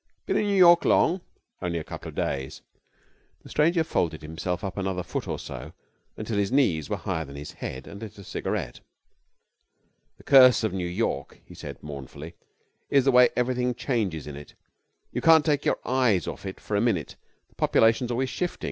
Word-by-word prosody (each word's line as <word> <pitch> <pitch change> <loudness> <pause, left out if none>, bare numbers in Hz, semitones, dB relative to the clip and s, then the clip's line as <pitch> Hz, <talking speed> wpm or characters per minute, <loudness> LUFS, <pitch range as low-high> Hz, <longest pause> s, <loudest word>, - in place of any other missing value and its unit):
'Been - - -1
in 210 - +1
New 200 -1 +1
York 175 -2 +7
long?' 180 +3 +3 0.4
'Only 85 -1 -2
a 80 - -3
couple - - -8
of - - -12
days.' 65 -1 -3 0.8
The - - -13
stranger 165 +2 +2
folded 80 - -1
himself 90 +5 -4
up 95 -4 -4
another 95 -2 -2
foot - - -4
or - - -2
so 60 +1 -8 0.4
until 110 -1 -2
his 100 -1 0
knees 90 - +2
were - - -1
higher 80 - -3
than 70 -2 -11
his 75 +1 -7
head, 65 0 -7
and 100 - -10
lit 110 -1 -9
a 100 - -10
cigarette. - - -4 1.4
'The - - -18
curse 130 -3 +7
of 110 - 0
New 90 -2 -2
York,' 95 +6 -3
he - - -14
said, - - -9
mournfully, 75 +2 -8 0.6
'is 140 -2 +3
the 135 - +5
way 125 -1 +7
everything 125 0 0
changes 110 - -2
in 75 -1 -7
it. 75 0 -12 0.6
You - - -3
can't 160 -2 +6
take 150 -3 +1
your - - +2
eyes 125 - +2
off - - -6
it 95 - -7
for 105 - -4
a 100 - +2
minute. 105 -10 0 0.3
The - - -29
population's 115 +2 +3
always 130 +2 -1
shifting. 180 -1 -3
105 Hz, 190 wpm, -26 LUFS, 80-130 Hz, 1.4 s, York